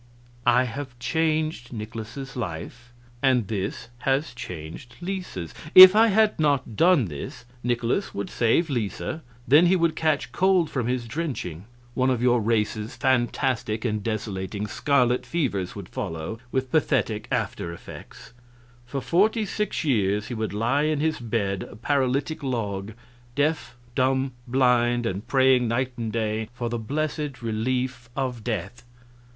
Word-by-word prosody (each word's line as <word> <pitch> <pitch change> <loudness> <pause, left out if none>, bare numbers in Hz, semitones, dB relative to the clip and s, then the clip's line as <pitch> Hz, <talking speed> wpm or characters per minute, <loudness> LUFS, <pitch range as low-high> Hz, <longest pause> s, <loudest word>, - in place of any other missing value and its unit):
"I 120 +1 +5
have 130 +1 -6
changed 155 +1 -1
Nikolaus's 115 +4 -7
life, 120 +3 -6 0.3
and 130 -6 +3
this 105 +2 -4
has 135 +3 0
changed 90 -1 -8
Lisa's. 175 - -5 0.2
If 185 +1 +12
I 225 +1 +6
had 215 -1 +3
not 140 -7 +1
done 170 - +4
this, 90 - -7 0.2
Nikolaus 120 - 0
would 100 -1 -4
save 120 +9 +2
Lisa, 120 +6 -3 0.3
then 155 +6 +6
he 185 - +4
would 170 -3 +2
catch 155 -6 0
cold 185 +1 +2
from 125 -4 -1
his 125 -1 -1
drenching; 115 - -4 0.3
one 130 +1 +2
of 125 -3 +1
your 120 -1 +3
race's 110 +1 -1
fantastic 120 -3 0
and 110 -3 0
desolating 105 -2 -3
scarlet 125 +1 +2
fevers 115 - -2
would 100 -4 -7
follow, 80 +4 -5
with 130 -1 -1
pathetic 110 -7 +1
after 105 -8 -2
effects; 85 +6 -11 0.5
for 135 +2 -3
forty 205 - +2
six 210 -1 -2
years 105 -7 +1
he - - -3
would 110 -2 -2
lie 115 +7 +1
in 155 -1 +1
his 155 +1 0
bed 105 -5 -1
a - - -11
paralytic 140 +5 0
log, 110 -6 -3 0.4
deaf, 145 -3 0 0.2
dumb, 130 +1 +1 0.2
blind, 120 -1 +3
and 100 +1 -3
praying 130 -2 +4
night 125 +3 0
and 115 -2 -3
day 110 -1 -2
for 120 -1 -3
the 120 0 -2
blessed 150 +1 -3
relief 125 +2 -2
of 125 -4 -3
death. 110 0 -4
125 Hz, 145 wpm, -25 LUFS, 110-140 Hz, 0.5 s, If